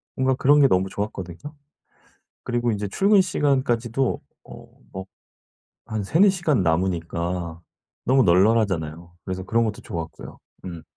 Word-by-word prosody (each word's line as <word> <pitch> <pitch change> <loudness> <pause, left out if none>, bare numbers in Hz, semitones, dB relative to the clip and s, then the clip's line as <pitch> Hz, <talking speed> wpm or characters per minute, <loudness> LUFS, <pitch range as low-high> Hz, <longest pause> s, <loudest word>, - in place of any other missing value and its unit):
뭔가 130 0 +2
그런 145 +3 +4
게 140 - +7
너무 95 -5 +1
좋았거든요. 95 -5 -5 1.1
그리고 120 -1 0
인제 105 -1 -3
출근 200 - +4
시간까지도 130 -7 0 0.2
어 - - -12 0.3
뭐 95 0 -6 0.8
한 110 -1 -2
3-4 175 - +4
시간 155 - 0
남으니까 85 0 -1 0.4
너무 130 +1 +4
널널하잖아요. 90 -4 +2
그래서 95 -1 -4
그런 115 +4 +1
것도 105 -2 -4
좋았고요. 80 -6 -7 0.2
음. 85 -3 -7
105 Hz, 290 characters per minute, -23 LUFS, 90-130 Hz, 1.1 s, 게